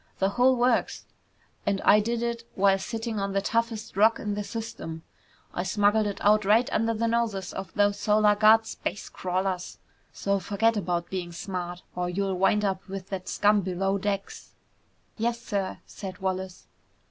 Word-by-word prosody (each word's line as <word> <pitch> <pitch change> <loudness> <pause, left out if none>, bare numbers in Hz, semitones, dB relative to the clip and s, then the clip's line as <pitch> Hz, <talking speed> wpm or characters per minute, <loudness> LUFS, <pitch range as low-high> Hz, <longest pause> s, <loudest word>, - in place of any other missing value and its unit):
The 195 - +2
whole 250 +5 +4
works! 245 -1 +1 0.6
And 200 -1 0
I 210 - +6
did 230 +2 -1
it 235 -1 -2
while 195 0 +4
sitting 225 0 -4
on 195 0 -2
the 195 - +2
toughest 225 0 -2
Rock 220 +3 +4
in 210 -1 -2
the 205 0 -3
system. 200 -8 -6 0.5
I - - -1
smuggled 205 +3 +2
it 200 - -3
out 210 +1 +4
right 220 +5 +4
under 225 +1 +1
the 230 +2 0
noses 230 -5 -1
of 195 0 -6
those 205 0 +2
Solar 210 0 +4
Guard 220 +2 +5
space 205 - -5
crawlers. 185 0 -2 0.3
So 200 0 -1
forget 215 +5 +1
about 175 -4 -2
being 180 -2 -3
smart, 175 0 -5
or 180 0 -1
you'll 195 +2 -1
wind 210 +2 +3
up 190 -1 -2
with 195 -1 -7
that 185 -2 -5
scum 205 0 +3
below 195 +2 -1
decks!" 200 0 -4 0.6
"Yes, 235 +1 0
sir!" 200 -5 -3
said 190 -3 -8
Wallace. 190 -1 -4
200 Hz, 170 wpm, -27 LUFS, 190-220 Hz, 0.6 s, I